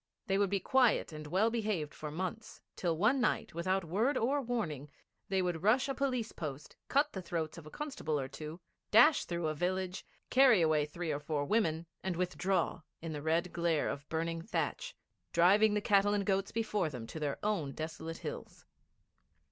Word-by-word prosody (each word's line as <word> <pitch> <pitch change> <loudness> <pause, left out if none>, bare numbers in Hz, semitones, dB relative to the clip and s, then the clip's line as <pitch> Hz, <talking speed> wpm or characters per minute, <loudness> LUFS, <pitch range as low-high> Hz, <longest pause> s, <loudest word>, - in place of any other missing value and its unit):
They 195 -3 +1
would 200 -1 +2
be 200 0 +1
quiet 245 -3 +3
and 155 -1 -7
well 195 +8 +2
behaved 210 -10 -1
for 155 - -6
months, 185 +8 -5 0.2
till 170 -3 -1
one 235 - +3
night, 225 - 0
without 185 +2 0
word 225 - +1
or 275 +5 +1
warning, 170 - -3 0.4
they 190 -1 +1
would 175 -3 -1
rush 240 +8 +3
a 275 - -1
police 255 -5 -1
post, 150 -2 -7
cut 290 +2 +2
the 190 - -4
throats 170 -2 -3
of 155 - -12
a - - -8
constable 160 - -3
or 135 - -3
two, 150 +4 -8 0.3
dash 285 +8 +6
through 170 -1 -3
a 155 - 0
village, 180 +3 -2 0.3
carry 255 -5 +6
away 155 -3 +3
three 165 +1 -4
or 145 - -1
four 145 -1 -2
women, 165 -5 +1 0.2
and 190 -2 -2
withdraw, 180 0 0 0.2
in 165 -1 -5
the 150 - -4
red 165 +3 0
glare 170 -3 +1
of 145 +1 -6
burning 165 +1 -2
thatch, - - -3 0.4
driving 205 +5 +5
the 210 - +1
cattle 205 0 +3
and 200 -1 0
goats 195 0 0
before 210 -6 0
them 125 -5 -7
to 160 - -7
their 145 -2 -2
own 200 -10 0
desolate 160 +2 -5
hills. - - -7
180 Hz, 190 wpm, -33 LUFS, 160-215 Hz, 0.4 s, dash